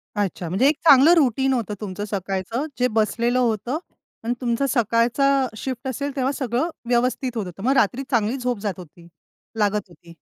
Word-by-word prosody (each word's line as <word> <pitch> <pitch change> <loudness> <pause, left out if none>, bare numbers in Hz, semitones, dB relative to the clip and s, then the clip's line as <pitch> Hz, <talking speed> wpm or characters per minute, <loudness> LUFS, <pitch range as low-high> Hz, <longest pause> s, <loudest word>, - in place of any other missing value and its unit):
अच्छा 190 -4 -2
म्हणजे 200 +10 +3
एक 300 - +3
चांगलं 285 +3 +8
रूटीन 265 -2 +2
होतं 220 -4 -2
तुमचं 205 0 -5
सकाळचं, 195 - -3
जे 250 - +3
बसलेलं 235 +3 +1
होतं 235 +3 0 0.5
आणि 240 +2 0
तुमचा 245 +3 0
सकाळचा 245 +3 +2
शिफ्ट 260 +1 -5
असेल 280 +2 -3
तेव्हा 265 0 0
सगळं 255 +5 -1 0.2
व्यवस्थित 250 +1 +1
होत 205 - -2
होतं. 180 +3 -9
मग 260 - +2
रात्री 250 +6 +2
चांगली 235 +2 +1
झोप 245 -4 -2
जात 200 -2 -2
होती, 170 -1 -13 0.5
लागत 205 -2 0
होती. 170 0 -16
235 Hz, 170 wpm, -22 LUFS, 205-265 Hz, 0.5 s, चांगलं